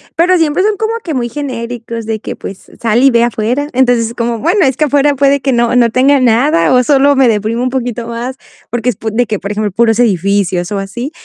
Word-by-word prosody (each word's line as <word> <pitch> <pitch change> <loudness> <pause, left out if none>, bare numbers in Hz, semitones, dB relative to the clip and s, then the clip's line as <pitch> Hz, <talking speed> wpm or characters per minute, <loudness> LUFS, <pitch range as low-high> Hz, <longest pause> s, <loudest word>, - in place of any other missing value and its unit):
pero 360 +2 +3
siempre 325 +3 +1
son 420 -1 0
como 445 +1 -2
que 320 - -4
muy 240 -2 -1
genéricos, 235 -4 -6
de 220 -1 -3
que - - -7
pues, 195 0 -10
sal 235 +2 +1
y 270 - +6
ve 235 0 +3
afuera. 240 +5 -1
Entonces, 245 -3 +2
es 230 - -7
como: 235 -1 -2
"Bueno, 355 - +1
es 265 -1 0
que 305 - +2
afuera, 285 0 +2
puede 280 0 +2
que 270 - 0
no 235 +1 +1
no 235 -2 +4
tenga 270 +4 +3
nada, 255 +6 +2
o 250 0 +4
sólo 285 +1 +3
me 265 -2 +4
deprimo 225 +2 -1
un 255 - 0
poquito 245 -2 -4
más". 240 +3 -5 0.3
Porque 240 +1 -1
es 230 - -2
po 220 - -4
de 240 +2 +1
que 210 -2 -3
por 200 - -5
ejemplo, 210 -1 -2
puros 225 +2 +1
edificios, 195 -3 0
o 200 - -2
así. 240 +9 -5
240 Hz, 240 wpm, -13 LUFS, 225-275 Hz, 0.3 s, y